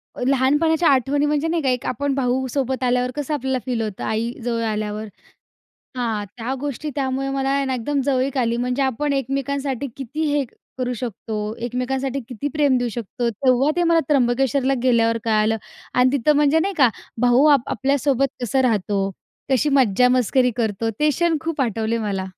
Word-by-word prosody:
अ, - - -8
लहानपणाच्या 295 +5 +3
आठवणी 275 +2 +2
म्हणजे 295 +2 0
नाही 330 0 0
का, 265 - +2
एक 250 -1 -1
आपण 280 +3 -1
भाऊ 260 0 0
सोबत 265 -2 -1
आल्यावर 250 0 +1
कसं 295 +1 -3
आपल्याला 265 -2 -1
फील 245 -3 -1
होतं, 210 -3 -4
आई 225 +2 -1
जवळ 235 -1 -1
आल्यावर? 215 -1 -2 0.9
हां, 225 -4 -1
त्या 245 +3 -3
गोष्टी 290 +1 -4
त्यामुळे 270 -1 -1
मला 270 0 -1
आहे 275 0 +1
ना 265 -1 -1
एकदम 275 +4 -1
जवळीक 270 0 0
आली. 235 -2 +1
म्हणजे 250 +3 -1
आपण 275 +3 0
एकमेकांसाठी 275 0 -2
किती 275 +4 -4
हे 285 -2 +1 0.3
करू 250 -1 -1
शकतो, 215 -2 -4
एकमेकांसाठी 265 +2 -2
किती 260 +3 -4
प्रेम 290 -4 +3
देऊ 245 0 -1
शकतो, 235 +1 -3
तेव्हा 255 +5 +2
ते 350 - +2
मला 330 -1 +4
त्र्यंबकेश्वरला 270 0 +2
गेल्यावर 230 -2 +3
कळालं. 220 0 +2 0.4
आणि 250 +1 +4
तिथं 285 +3 +2
म्हणजे 295 +2 +4
नाही 390 +4 -1
का, 260 -4 +6 0.3
भाऊ 245 +3 +4
आप 260 -4 -1
आपल्यासोबत 275 +2 +1 0.2
कसं 260 +3 +1
राहतो, 200 -4 0 0.4
कशी 265 +3 +2
मज्जा-मस्करी 250 +1 +3
करतो, 225 -1 -1
ते 300 - +4
क्षण 335 +2 +1
खूप 325 -2 -3
आठवले 225 -1 0
मला. 200 -3 -2
260 Hz, 170 wpm, -21 LUFS, 235-280 Hz, 0.9 s, का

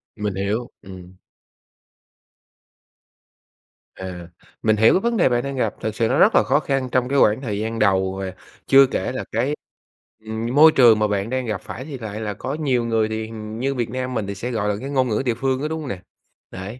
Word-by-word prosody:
Mình 105 -3 -3
hiểu, 105 +5 -2
ừm. 90 -1 -12 2.8
À, 90 -2 -8 0.4
mình 110 -1 +3
hiểu 110 +1 +5
cái 185 - +3
vấn 235 +1 0
đề 170 - +4
bạn 120 0 +1
đang 140 0 -4
gặp, 110 -5 0
thực 110 0 -3
sự 115 - +1
nó - - +1
rất - - +5
là - - +6
khó - - +2
khăn 135 -2 -2
trong 125 0 +1
cái 140 -1 +2
quãng 110 +5 +4
thời 105 -5 -3
gian 110 +1 -3
đầu 95 -2 +2
và 95 -1 -4 0.3
chưa 135 0 +7
kể - - -2
là 130 - -4
cái 145 +3 0 0.7
ừm, 115 +3 -3
môi 155 +2 +8
trường 115 -6 +6
mà 105 - +2
bạn 100 +1 -2
đang 130 -1 -2
gặp 105 -4 -3
phải 130 +4 -8
thì 145 -4 -7
lại 110 -2 -6
là 105 -1 -3
có 130 +7 -5
nhiều 130 -6 0
người, 110 -1 +1
thì 110 0 -3
hình 110 0 -8
như 135 +1 -1
Việt 120 -3 -2
Nam 130 +1 -4
mình 105 -4 -2
thì 100 - -4
sẽ, 120 +5 -4
gọi 105 -2 -1
là, 100 - 0
cái 135 - -5
ngôn 130 -2 +1
ngữ 105 - 0
địa 120 - +1
phương 130 +2 -1
đó, 150 - -1
đúng 160 0 -3
hông 140 - -6
nè? 90 -5 -5 0.5
Đấy, 100 +7 -8
115 Hz, 230 wpm, -22 LUFS, 105-130 Hz, 2.8 s, môi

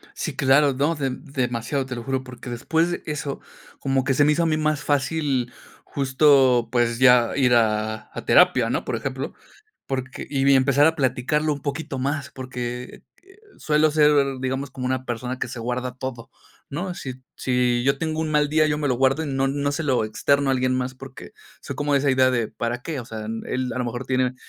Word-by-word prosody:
Sí, - - -4
claro, 135 +1 +4
no, 145 +5 +1
de 135 -4 -2
demasiado, 130 -1 -3
te 130 - -5
lo 120 - -6
juro, 130 +1 -2
porque 125 -1 -10
después 160 +8 0
de 175 - -4
eso, 145 -2 -4 0.4
como 135 -1 0
que 135 - +1
se 145 +2 +4
me 150 - +4
hizo 170 - +1
a - - +2
mí 155 -1 +1
más 155 -1 0
fácil 140 -3 0 0.3
justo, 130 -3 +3
pues 120 -1 +1
ya 125 -2 +5
ir 125 -3 +3
a 110 -1 0
a - - -7
terapia, - - +5
¿no? - - -1
Por - - -2
ejemplo, 135 +1 -4 0.5
porque 130 -1 -4
y 135 -2 0
vi 140 0 +6
empezar 140 +3 +4
a 160 - +2
platicarlo 140 +3 0
un 145 - -5
poquito 140 -2 -4
más, 140 +1 -2
porque 125 -1 -6 0.6
suelo 155 0 +2
ser, 150 0 +4 0.3
digamos, 130 +1 -3
como 125 -1 -5
una 130 0 -1
persona 125 +1 -4
que 125 - -3
se 120 -1 -7
guarda 125 +1 -3
todo, 130 -3 -6 0.4
¿no? 180 +5 -4
Si 130 -6 -6 0.2
si 125 -1 +1
yo 140 0 +2
tengo 160 -1 -2
un 160 -1 -2
mal 150 -1 +2
día, 155 +1 +3
yo 150 -1 0
me 145 -1 -1
lo 130 - +2
guardo 135 +4 +2
y - - -5
no 135 -1 0
no 145 +1 -1
se 145 - -2
lo 130 -7 +1
externo 140 +6 +1
a - - +3
alguien 130 0 +1
más 130 0 -2
porque 130 0 -11 0.3
soy - - -7
como 145 0 -1
de 140 - +5
esa 140 0 +1
idea 130 0 +4
de 120 -4 0
para 120 +1 -4
qué, 155 -1 -4
o - - -8
sea, 110 -1 -7 0.2
él 130 0 -2
a - - -3
lo 125 - -1
mejor 120 +2 -5
tiene 130 -1 +1
130 Hz, 215 wpm, -23 LUFS, 125-145 Hz, 0.6 s, vi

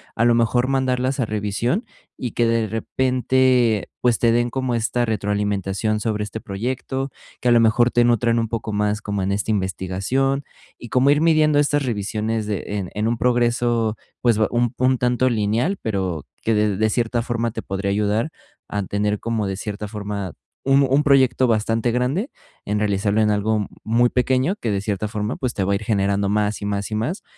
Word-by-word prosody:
a 115 - +2
lo 120 0 +5
mejor 120 +2 +2
mandarlas 130 0 0
a 125 - +2
revisión, 110 - -1 0.3
y 125 - -4
que 120 - +1
de 115 -1 +1
repente, 125 0 +1
pues, 120 -2 +2
te 115 - +3
den 120 +1 +1
como 130 -1 -1
esta 120 +1 0
retroalimentación 105 -1 -1
sobre 105 -1 -1
este 105 +1 -6
proyecto 130 +6 -3 0.3
que - - -1
a - - +5
lo 120 - +6
mejor, 115 +2 +4
te 120 - +3
nutran 120 0 +2
un 115 -1 0
poco 110 -1 -4
más 105 +1 0
como 100 -2 -2
en 95 - 0
este 100 +2 -2
investigación, 100 +8 -1 0.3
y 120 - -10
como 130 +4 +3
ir 145 +1 +4
midiendo 155 -2 +4
estas 145 0 +2
revisiones 110 -1 -2
de 105 -3 -3
en 100 -3 -3
en 105 +1 -1
un 115 +1 0
progreso, 120 -2 +1 0.2
pues, 120 -3 +3
ba 110 - +3
un 120 0 +1
un 130 +1 +2
tanto 125 +1 +2
lineal, 115 - 0
pero, 95 -8 -2 0.2
que 115 - +1
de 105 -2 +1
de 110 +1 +2
cierta 120 0 0
forma, 120 -1 -1
te 115 - -5
podría 95 +1 -3
ayudar 105 +6 0 0.4
a 105 -1 -2
tener 105 +2 -1
como, 115 -3 -2
de 95 -1 -3
cierta 105 +1 -5
forma, 100 -4 -5 0.3
un 135 +1 +4
un 140 +3 +3
proyecto 130 -3 +4
bastante 115 +1 +1
grande, 130 - 0 0.4
en 105 +1 -1
realizarlo 105 +1 +1
en 105 -1 +3
algo 105 0 0 0.2
muy 120 +2 +3
pequeño, 130 +8 +1
que 115 - -2
de 100 -1 -1
cierta 100 0 -2
forma, 105 +1 -3
pues, 125 -2 -2
te 100 - -1
va 95 - 0
a - - +3
ir 100 - -3
generando 100 -1 +1
más 105 0 0
y - - -3
más 100 +1 -2
y - - -1
más, 135 - -2
115 Hz, 195 wpm, -22 LUFS, 105-125 Hz, 0.4 s, lo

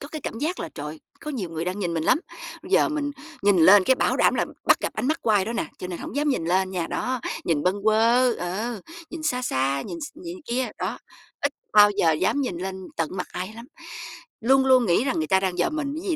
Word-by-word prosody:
có 285 - -8
cái 310 -1 -6
cảm 225 - -5
giác 325 +6 -2
là, - - -4
trời, 150 +1 -7 0.2
có 300 - -5
nhiều 205 - -4
người 165 0 -3
đang 185 +3 -3
nhìn 175 -4 -2
mình 160 - -1
lắm, 255 - +4 0.4
bây 360 - -11
giờ - - +5
mình 295 -2 -2 0.3
nhìn 200 -2 +4
lên 185 +4 +7
cái 260 - +4
bảo - - +1
đảm - - +3
là - - +1 0.2
bắt - - +6
gặp - - -2
ánh - - -3
mắt 315 - 0
của 225 - +1
ai 200 -3 +4
đó 230 - -3
nè, 235 - -2
cho - - -5
nên 180 -2 -6
hổng - - -7
dám 295 +1 +1
nhìn 255 - 0
lên 185 +2 +1
nha. 180 -3 -2
Đó, 255 -1 -2 0.2
nhìn 155 -4 +1
bâng 185 +2 +1
quơ 230 +3 +4
ờ, 205 +6 -3 0.3
nhìn 330 -2 -7
xa 250 -5 0
xa, 135 - 0
nhìn 340 - -6
x 300 - -4
nhìn 345 +2 -8
kia, 250 +1 0
đó, - - -3 0.4
ít 285 - 0 0.2
bao 205 -1 +8
giờ 175 -5 +2
dám 185 - +1
nhìn 220 -10 -2
lên 190 +1 -4 0.2
tận 165 -2 0
mặt 180 - -3
ai 185 +4 -5
lắm, 235 - -9 0.8
luôn 265 +3 +4
luôn 255 -2 +5
nghĩ 175 +5 +3
rằng 265 - 0
người 155 - -1
ta 190 +2 +4
đang 185 -2 -2
dòm 175 - 0
mình 285 -2 -2
cái 390 - -5
gì 330 - +2
215 Hz, 265 wpm, -24 LUFS, 180-265 Hz, 0.8 s, bao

